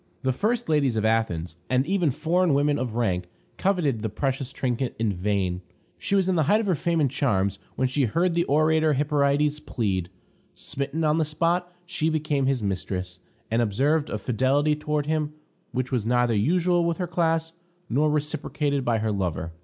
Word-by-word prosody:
The 130 0 +1
first 230 - -1
ladies 145 -6 +2
of 110 -1 0
Athens, 90 -7 0
and 130 +1 +2
even 180 -2 +1
foreign 165 +3 +1
women 145 +1 +2
of 120 -3 -3
rank, 95 -7 0 0.3
coveted 170 - +1
the 110 - -2
precious 135 +4 -2
trinket 125 -1 -2
in 110 -3 0
vain. 95 -1 -1 0.4
She 195 - 0
was 190 -2 +2
in 190 - +2
the 165 - +2
height 210 - +5
of 225 - -1
her 190 - +2
fame 170 +1 0
and 140 -5 +2
charms 100 -8 0 0.2
when 130 - +1
she 130 +1 +1
heard 170 - +1
the 170 0 +2
orator 155 +1 +3
Hyperides 145 +1 +1
plead. 95 -6 -2 0.5
Smitten 140 +4 -3
on 155 +1 +2
the - - +3
spot, 170 +4 0
she 170 -3 -1
became 150 -3 0
his 135 -4 0
mistress, 90 -2 -3 0.3
and 115 +1 +2
observed 140 +8 +1
a - - -2
fidelity 130 +7 +1
toward 150 -1 -2
him 150 -1 -1 0.4
which 130 0 -2
was 125 -5 0
neither 120 -1 +2
usual 175 - +2
with 170 -1 0
her 180 - -1
class, 165 -1 0 0.3
nor 145 +6 +2
reciprocated 150 -1 -1
by 120 -2 +1
her 110 0 -1
lover. 90 -5 -2
140 Hz, 185 wpm, -25 LUFS, 115-160 Hz, 0.5 s, height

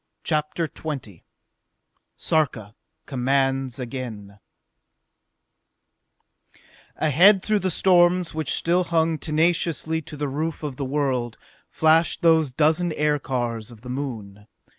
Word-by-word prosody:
CHAPTER 155 +1 -1
XX 135 - -7 1.0
Sarka 125 -10 -1 0.3
Commands 135 -1 0
Again 115 -6 -7 2.6
Ahead, 185 +6 +4
through 215 -1 +1
the 190 - -1
storms 175 -1 +3
which 155 -1 -1
still 175 +2 +1
hung 165 -2 +1
tenaciously 160 0 0
to 155 -1 -10
the 145 0 -2
roof 155 +4 -4
of 140 -4 -5
the 140 - -3
world, 130 -4 -1 0.3
flashed 160 +2 +2
those 160 -4 +4
dozen 160 +5 +1
aircars 130 -7 -1
of 115 -3 -13
the 125 +1 -8
Moon. 110 -7 -6
150 Hz, 105 wpm, -23 LUFS, 125-160 Hz, 2.6 s, Ahead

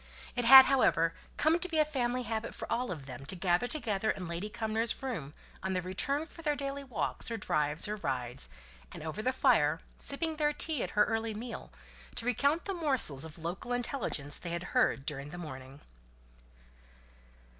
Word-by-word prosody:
It 245 -1 0
had, 265 +2 +12
however, 165 -11 +3 0.2
come 320 +3 +3
to 365 - -2
be 325 - -1
a 305 - +5
family 250 -4 -1
habit 225 0 -3
for - - -5
all 245 +2 0
of 155 -7 -5
them 130 -1 -8
to 190 - -1
gather 180 +5 +1
together 220 -7 -1
in 185 -4 -2
Lady 170 +5 -3
Cumnor's 225 +3 -1
room 160 - -4 0.3
on 190 0 -2
their 180 -1 -1
return 275 - -1
from 330 - -13
their 300 -2 +1
daily 280 0 -4
walks, 255 -2 -2
or 230 - -2
drives, 150 -3 +1
or 210 +1 -3
rides, 125 - -3 0.4
and - - -8
over 160 +6 -4
the 255 - +1
fire, 160 - +3 0.2
sipping 315 +2 -1
their 295 -1 +2
tea 310 -3 0
at - - -2
her 210 - +7
early 225 -1 -1
meal, 235 +3 -7 0.4
to 230 - -3
recount 280 +7 +1
the 395 - -2
morsels 265 - +3
of 160 0 -9
local 175 +9 -4
intelligence 225 - -2
they 175 - -6
had 170 +1 -3
heard 135 - +2
during 145 -2 -4
the 175 - -8
morning. 135 -4 -9
220 Hz, 190 wpm, -31 LUFS, 165-270 Hz, 0.4 s, had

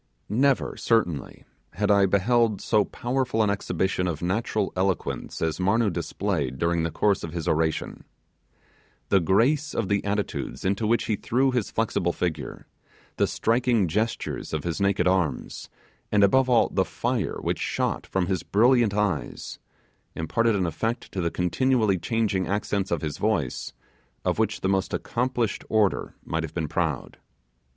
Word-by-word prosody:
Never, 130 +6 +2
certainly, 90 - 0 0.3
had 105 +4 +1
I 100 -1 +5
beheld 110 +2 +2
so 105 -2 +2
powerful 125 -2 -1
an 105 - +2
exhibition 95 -2 -1
of 80 -1 -3
natural 100 +2 -1
eloquence 90 -11 -2
as 80 +1 -1
Marnoo 100 +3 +2
displayed 80 -9 -2
during 85 +1 +1
the 80 - 0
course 100 +4 +1
of 80 - -5
his 85 -3 -4
oration. 80 0 -1 1.1
The 100 - +5
grace 125 - +2
of 100 -5 -1
the 100 0 +1
attitudes 100 0 -3
into 100 +3 +1
which 115 +2 +2
he 110 - 0
threw 130 +6 +1
his 120 -5 -1
flexible 90 -6 0
figure, 80 -4 -4 0.5
the - - +3
striking 115 -3 +1
gestures 110 +2 -2
of 80 - -2
his 85 +3 -3
naked 100 -1 +2
arms, 90 -5 -1 0.4
and 105 -1 +4
above 130 +6 +4
all, 120 -2 +4
the - - +1
fire - - -2
which - - -2
shot - - -1
from 95 -2 0
his 95 -2 -1
brilliant 115 -1 +3
eyes, 105 -7 -2 0.6
imparted 115 +8 +1
an 95 -2 +1
effect 110 - -3
to 95 - -2
the 85 - +1
continually 105 +3 +1
changing 105 -3 0
accents 100 -1 -1
of 85 -3 -1
his 75 -2 -4
voice, 100 - -1 0.5
of - - 0
which 110 -1 0
the - - 0
most 95 0 0
accomplished 120 -3 -1
orator 105 -3 +1
might 80 - -1
have 80 -2 -6
been 80 -3 -1
proud. - - -2
100 Hz, 155 wpm, -25 LUFS, 90-115 Hz, 1.1 s, I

